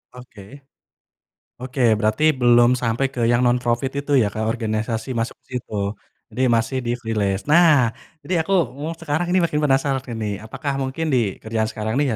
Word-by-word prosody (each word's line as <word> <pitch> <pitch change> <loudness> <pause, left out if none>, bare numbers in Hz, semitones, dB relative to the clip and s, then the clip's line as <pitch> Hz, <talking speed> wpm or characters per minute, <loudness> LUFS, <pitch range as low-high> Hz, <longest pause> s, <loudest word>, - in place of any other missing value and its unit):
Oke. 125 -4 -13 1.2
Oke, 130 +2 -6 0.2
berarti 110 +6 0 0.2
belum 120 0 +5
sampai 120 +3 +1
ke 120 - -4
yang 120 0 +3
non-profit 120 +1 0
itu 145 0 -4
ya, 105 - +2
ke 110 - -4
organisasi 110 0 -2
masuk 115 0 -3
situ? 125 -4 -6 0.6
Jadi, 130 - -2
masih 120 +4 -1
di 120 - 0
freelance. 105 -4 -2
Nah, 150 -7 +5 0.3
ini 185 - -2
aku, 195 - -4 0.2
mmm, 150 +4 -5
sekarang 165 +2 -2
ini 185 - +3
makin 150 -3 0
penasaran 135 -1 +1 0.2
ini, 110 - -3 0.2
apakah 140 +6 -4
mungkin 135 +5 -3
di 115 -6 0
kerjaan 110 0 -1
sekarang 110 0 -3
nih 145 - +2
125 Hz, 165 wpm, -21 LUFS, 110-140 Hz, 1.2 s, belum